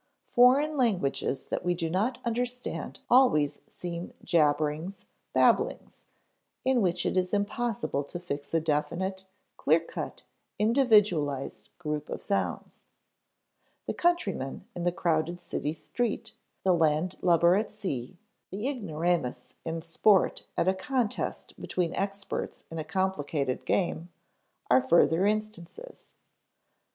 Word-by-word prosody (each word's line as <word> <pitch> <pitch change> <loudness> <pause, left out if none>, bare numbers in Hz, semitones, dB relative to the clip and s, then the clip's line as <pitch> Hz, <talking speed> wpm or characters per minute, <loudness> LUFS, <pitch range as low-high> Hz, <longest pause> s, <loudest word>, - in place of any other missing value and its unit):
Foreign 275 +5 +5
languages 180 - 0
that - - -3
we 175 0 +1
do 165 -1 -2
not 210 +9 0
understand 245 +1 -3
always 155 - +4
seem 175 0 -6
jabberings, 155 +3 +1 0.3
babblings, - - +2 0.6
in 260 -2 +3
which 180 -3 +1
it - - 0
is 185 +2 +1
impossible 205 -8 -1
to 160 +5 -7
fix 145 -5 -5
a 165 - +3
definite, 170 +5 -1 0.3
clear - - +4
cut, - - -7 0.3
individualized 210 - +2
group 150 -3 -4
of - - -5
sounds. 200 - -2 1.0
The - - -2
countryman 210 - 0
in 175 -1 -3
the 175 - +3
crowded 170 0 0
city 150 -3 -3
street, 220 +6 -3 0.3
the 185 - +4
landlubber 170 +2 +3
at 215 +3 0
sea, 180 - -5 0.3
the 205 +6 -3
ignoramus 170 - -1
in 165 0 -4
sport 190 +4 +3
at - - +2
a 190 - +5
contest 230 +3 -2
between 175 -2 -1
experts 195 0 -3
in 165 - -4
a - - -2
complicated 155 -6 -1
game, 175 -2 0 0.6
are 130 +1 +5
further 165 +6 +4
instances. 215 - -4
180 Hz, 120 wpm, -28 LUFS, 155-215 Hz, 1.0 s, Foreign